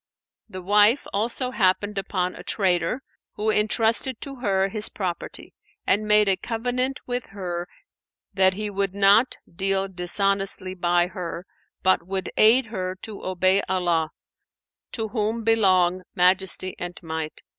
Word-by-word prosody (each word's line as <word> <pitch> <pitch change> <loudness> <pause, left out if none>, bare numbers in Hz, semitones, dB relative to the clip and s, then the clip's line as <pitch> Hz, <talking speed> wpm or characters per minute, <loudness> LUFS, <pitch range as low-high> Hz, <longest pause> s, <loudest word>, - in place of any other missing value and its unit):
The 185 -2 -8
wife 210 +6 +4
also 235 +5 -1
happened 205 -1 +1
upon 185 -2 -2
a - - -10
trader 195 +6 0 0.3
who 215 +1 0
entrusted 225 +3 +1
to 275 -1 -7
her 195 -5 +1
his 210 +1 -2
property 180 -4 -5 0.3
and 210 +2 +1
made 210 0 +5
a 195 - +4
covenant 250 +3 -2
with 245 0 -3
her 180 -3 -5 0.7
that 190 -1 +3
he 210 +1 -3
would 200 -1 -2
not 200 +5 +4 0.2
deal 195 +1 0
dishonestly 195 +1 -1
by 175 -1 +2
her, 180 -1 -6 0.4
but 185 0 +3
would 190 -1 -3
aid 230 +4 +6
her 185 -2 -3
to 215 -2 -8
obey 185 +1 +2
Allah 175 -4 +1 0.8
(to 220 -2 -3
whom 220 +1 -2
belong 185 -5 +3
Majesty 185 +1 +3
and 175 0 -6
Might!) 160 -1 -5
195 Hz, 135 wpm, -24 LUFS, 185-215 Hz, 0.8 s, aid